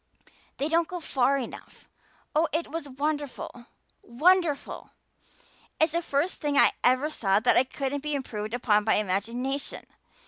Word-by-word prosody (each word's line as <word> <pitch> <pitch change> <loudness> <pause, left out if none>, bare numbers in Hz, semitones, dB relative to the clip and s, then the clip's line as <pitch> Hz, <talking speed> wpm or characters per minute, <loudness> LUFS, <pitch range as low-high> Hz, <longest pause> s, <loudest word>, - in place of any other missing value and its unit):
They 280 - 0
don't 330 +1 +2
go 360 - -5
far 275 -3 +1
enough. 255 - -8 0.5
Oh, 320 +2 +3
it 325 +2 -2
was 320 -3 -5
wonderful 280 -3 -4 0.3
wonderful. 315 +4 +1 0.9
It's 315 0 +4
the 340 +2 0
first 310 +2 -1
thing 290 -1 0
I - - +7
ever 260 +5 +3
saw 195 -8 +2
that 250 +3 +3
couldn't 275 0 -2
be 300 0 -2
improved 215 -5 -4
upon 210 -4 +2
by 220 - +3
imagination. 230 +8 -2
275 Hz, 140 wpm, -27 LUFS, 245-310 Hz, 0.9 s, I